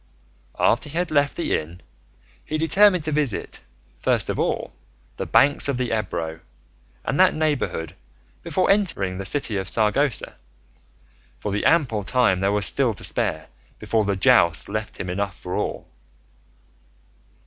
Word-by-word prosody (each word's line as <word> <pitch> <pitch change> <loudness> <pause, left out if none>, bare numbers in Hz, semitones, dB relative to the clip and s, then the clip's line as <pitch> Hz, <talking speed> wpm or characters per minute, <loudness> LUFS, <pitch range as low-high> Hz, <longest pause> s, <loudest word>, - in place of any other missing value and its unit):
After - - +1
he 155 - -6
had 180 +1 -1
left 145 -1 +1
the 170 - 0
inn 85 +3 -5 0.6
he 155 - -3
determined 180 +2 +4
to 155 - -2
visit, 145 -7 -2 0.4
first - - +1
of - - -5
all, - - -2 0.4
the - - -4
banks 145 0 +4
of 135 - -1
the 125 -1 -2
Ebro 80 -6 -4 0.7
and - - -2
that - - +5
neighbourhood, 145 - -2 0.5
before 185 - +1
entering 100 - 0
the 95 - -2
city 130 -8 -1
of 95 -1 -2
Saragossa, 115 +4 +1 1.0
for 105 - -4
the 105 - -2
ample 135 -11 +2
time 100 -5 +2
there 95 +1 +1
was 105 -1 +3
still 125 -2 +3
to - - -9
spare - - -1 0.3
before 110 +1 0
the 100 -1 -1
jousts 85 -2 +3
left 110 +1 -5
him 95 - -4
enough 100 +1 -3
for 90 - -7
all. - - -3
110 Hz, 150 wpm, -23 LUFS, 95-150 Hz, 1.0 s, that